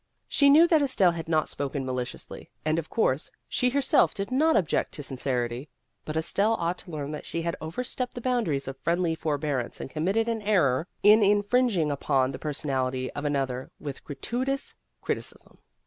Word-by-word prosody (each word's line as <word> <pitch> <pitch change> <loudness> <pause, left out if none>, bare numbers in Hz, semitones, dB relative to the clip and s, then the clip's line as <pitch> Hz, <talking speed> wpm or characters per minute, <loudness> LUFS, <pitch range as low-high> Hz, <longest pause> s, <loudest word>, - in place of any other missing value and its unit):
She 280 -1 +4
knew 315 +4 +7
that 320 -3 +4
Estelle 205 -10 +3
had 165 -1 -6
not 155 -2 +2
spoken 140 -1 -3
maliciously, 125 -1 -5 0.2
and 155 +1 +2
of 160 - -7
course 145 - +1 0.2
she 250 - +1
herself 275 +1 +3
did 200 +3 -4
not 315 +5 +3
object 175 - 0
to 145 - -5
sincerity; 125 0 -3 0.4
but 155 +1 -3
Estelle 200 +7 +1
ought 170 -2 -2
to - - -11
learn 150 -3 -4
that 150 - -6
she 165 - -3
had 170 0 -1
over 160 +10 -4
stepped 250 0 -4
the - - -4
boundaries 225 - 0
of 135 0 -6
friendly 170 0 +1
for 155 -2 -1
bearance 140 -5 -2
and - - -6
committed 195 +9 0
an 230 -1 -1
error 175 -8 +2 0.2
in 210 +2 +7
infringing 205 -4 +3
upon 135 -2 +1
the - - -7
personality 130 -4 -2
of 145 - -5
an 145 -1 +1
other 130 -2 -2
with 140 -3 -7
gratuitous 250 - -2 0.3
criticism. - - -5
160 Hz, 185 wpm, -27 LUFS, 140-220 Hz, 0.4 s, knew